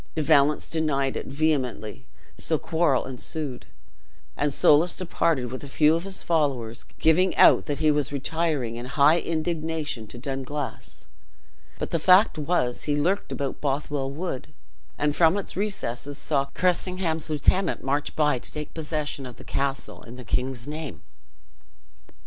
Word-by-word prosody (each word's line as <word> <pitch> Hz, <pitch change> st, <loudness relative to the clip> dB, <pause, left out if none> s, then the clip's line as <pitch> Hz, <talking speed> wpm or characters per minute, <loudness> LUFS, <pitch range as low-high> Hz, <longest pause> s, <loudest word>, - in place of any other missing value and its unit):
De 155 Hz, -, 0 dB
Valence 150 Hz, -1 st, +4 dB
denied 140 Hz, -4 st, 0 dB
it -, -, -4 dB
vehemently 135 Hz, -7 st, -1 dB, 0.3 s
so -, -, +1 dB
quarrel 160 Hz, -5 st, +1 dB
ensued, 130 Hz, -, -4 dB, 0.7 s
and 145 Hz, +1 st, 0 dB
Soulis 155 Hz, +5 st, +4 dB
departed 165 Hz, -8 st, 0 dB
with 130 Hz, -, -6 dB
a -, -, -7 dB
few 150 Hz, +2 st, +4 dB
of 165 Hz, +2 st, -1 dB
his 195 Hz, -1 st, -6 dB
followers, 135 Hz, -9 st, 0 dB
giving 180 Hz, +4 st, +3 dB
out -, -, +6 dB
that 145 Hz, -2 st, -1 dB
he 155 Hz, +1 st, +3 dB
was 145 Hz, -2 st, 0 dB
retiring 140 Hz, -4 st, -1 dB
in 120 Hz, +1 st, -6 dB
high 145 Hz, +4 st, +4 dB
indignation 160 Hz, -7 st, -2 dB
to 120 Hz, -, -10 dB
Dunglass. 135 Hz, +2 st, -5 dB, 0.7 s
But -, -, -4 dB
the 165 Hz, -, +1 dB
fact 185 Hz, +2 st, +5 dB
was, 145 Hz, -6 st, 0 dB
he 145 Hz, -, +1 dB
lurked 180 Hz, +7 st, 0 dB
about 140 Hz, -1 st, -3 dB
in -, -, -33 dB
Bothwell 140 Hz, -1 st, -1 dB
wood; 150 Hz, -1 st, -5 dB, 0.5 s
and 150 Hz, 0 st, 0 dB
from 165 Hz, +3 st, +4 dB
its 200 Hz, -, -5 dB
recesses 145 Hz, -, -3 dB
saw 140 Hz, -3 st, 0 dB
Cressingham's 175 Hz, +1 st, -1 dB
lieutenant 160 Hz, +5 st, +1 dB
march 140 Hz, +2 st, -1 dB
by 150 Hz, -4 st, +2 dB
to -, -, -8 dB
take 150 Hz, -1 st, -6 dB
possession 150 Hz, -3 st, -3 dB
of 125 Hz, -, -10 dB
the -, -, -13 dB
castle 140 Hz, 0 st, -3 dB
in 120 Hz, -, -11 dB
the 125 Hz, -1 st, -10 dB
king's 125 Hz, +2 st, -2 dB
name. 150 Hz, -3 st, -6 dB
150 Hz, 155 wpm, -25 LUFS, 135-160 Hz, 0.7 s, out